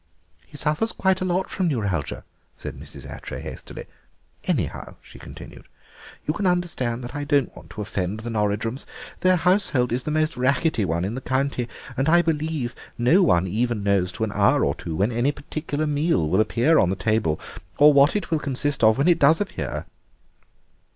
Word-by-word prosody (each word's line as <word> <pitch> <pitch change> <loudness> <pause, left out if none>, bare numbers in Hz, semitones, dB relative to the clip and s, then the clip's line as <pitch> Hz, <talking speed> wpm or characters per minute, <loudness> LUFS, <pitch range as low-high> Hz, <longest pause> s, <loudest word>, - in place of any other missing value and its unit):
"He 145 - -12
suffers 155 +10 0
quite 190 -1 +1
a - - 0
lot 185 +1 0
from 185 -2 -1
neuralgia," 100 - -2 0.3
said - - -7
Mrs. - - -10
Attray - - -7
hastily. - - -8 0.6
"Anyhow," - - -2
she - - -15
continued, - - -11 0.6
"you 150 - 0
can 200 +2 -1
understand 155 -10 -1
that 120 +1 -7
I 145 0 -3
don't 145 -3 +1
want - - -13
to 105 - -7
offend 100 0 -3
the 120 +1 -5
Norridrums. 110 +3 -1 0.3
Their 185 0 +4
household 180 - +2
is 125 +2 0
the 150 - -5
most 155 0 +1
rackety 130 - +1
one 85 +1 -1
in 100 - -3
the 130 - -5
county, 130 -1 -1 0.3
and 135 +4 +1
I 175 +1 +5
believe 155 -5 -1 0.2
no 140 +11 +4
one 95 - +3
ever 120 +6 0
knows 100 -3 +1
to - - -3
an 110 - -1
hour 100 0 +3
or - - +1
two 80 - -6
when 100 +7 +1
any 120 +5 +1
particular 150 +1 -4
meal 150 - +1
will 95 +7 +3
appear 120 +9 +3
on 95 - +3
the 95 - 0
table 100 -5 0 0.4
or 150 +1 +7
what 140 +5 +5
it 205 -5 -2
will 160 - +2
consist 140 -1 -2
of 110 0 +6
when 140 +4 +2
it 170 -2 +4
does 150 +3 +5
appear." 205 -1 -4
135 Hz, 190 wpm, -24 LUFS, 110-155 Hz, 0.6 s, or